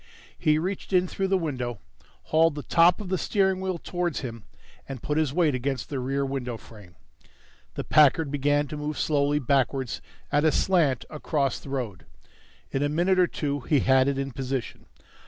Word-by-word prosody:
He 155 0 +2
reached 185 +4 -4
in 180 0 +4
through 195 +2 -2
the 190 0 +2
window, 130 - -3 0.5
hauled 160 -1 +4
the 145 - -5
top 170 +1 +4
of 205 -4 -6
the 185 -1 0
steering 190 -2 +1
wheel 190 -2 -2
towards 175 -1 -3
him 115 -5 -7 0.4
and 135 -4 -7
put 150 +1 0
his 155 -4 +1
weight 160 -1 +2
against 130 0 -2
the 140 - -2
rear 135 +2 -1
window 130 -3 -3
frame. 105 -7 -15 0.8
The - - -3
Packard 150 0 +4
began 145 +1 +1
to 150 - -5
move 150 0 -4
slowly 145 -1 +1
backwards 135 -2 0 0.3
at 145 - +3
a 155 - +4
slant 160 -10 +2
across 145 -3 -1
the - - -11
road. 120 -9 -4 0.6
In 135 - -1
a 145 - +1
minute 175 +5 +2
or 180 - +5
two 145 -3 -2
he 140 +2 +1
had 130 0 +4
it 140 -1 0
in 135 0 -3
position. 130 -1 -4
145 Hz, 185 wpm, -26 LUFS, 135-165 Hz, 0.8 s, or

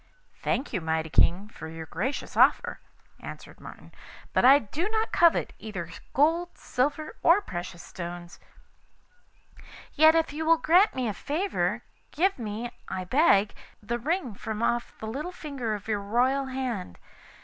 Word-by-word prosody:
'I - - -34
thank 265 +1 -1
you, 185 - -1
mighty 160 0 -2
King, 185 +6 +3
for 160 - -9
your 160 0 -7
gracious 260 - -4
offer,' - - +3 0.4
answered - - -10
Martin,' - - -12 0.4
'but - - +3
I 270 +3 +9
do 295 - -3
not 440 0 -1
covet 340 -1 +3
either 180 -6 -6 0.2
gold, 330 +5 +2
silver, 290 +4 -2
or 340 +4 +6
precious 175 - -7
stones; 175 0 -8 1.5
yet 315 +1 +6
if 325 -3 +1
you 315 +2 -3
will 330 +1 +5
grant 355 +6 +4
me 255 -2 -1
a 215 - -1
favour, 335 - -1 0.3
give 375 +1 +1
me, 225 +2 -4 0.2
I 185 - -3
beg, 210 - +3 0.3
the 235 +3 -3
ring 310 - -1
from 215 +2 -5
off 240 0 -1
the - - -7
little 280 +11 -4
finger 275 -10 -4
of 205 0 -9
your 210 -2 -1
royal 255 +6 +1
hand. 250 - -4
250 Hz, 155 wpm, -27 LUFS, 205-315 Hz, 1.5 s, I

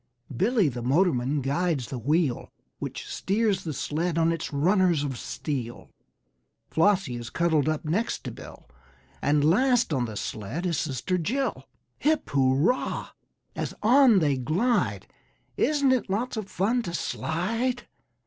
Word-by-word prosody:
Billy, 215 - +2
the 125 -3 -3
motorman, 140 0 +1
guides 140 0 -1
the 130 - -4
wheel 145 +1 0 0.3
Which - - -6
steers 205 0 0
the 160 - -3
sled 160 +4 -2
on 165 0 +3
its 165 -1 -3
runners 175 +1 +2
of 135 -3 -3
steel. 120 -2 -5 0.8
Flossie 165 -7 +2
is 120 -1 -7
cuddled 160 -3 +1
up 155 +1 -2
next 190 +10 -1
to - - -5
Bill, - - -12 0.5
And 145 0 +2
last 245 - +3
on 125 -3 +1
the 110 -3 -6
sled 115 - -4
is 170 -4 0
Sister 155 +5 -1
Jill. 260 - -2 0.3
Hip 310 +1 +1
hurrah! 140 - +1 0.5
as - - -4
on 245 0 +6
they 145 -6 +2
glide, 180 - 0 0.5
Isn't 285 -3 +2
it 255 -6 +1
lots 230 +7 -1
of 215 -3 -5
fun 225 +7 +1
to 175 -6 -5
slide? 230 +12 -2
165 Hz, 140 wpm, -26 LUFS, 140-215 Hz, 0.8 s, on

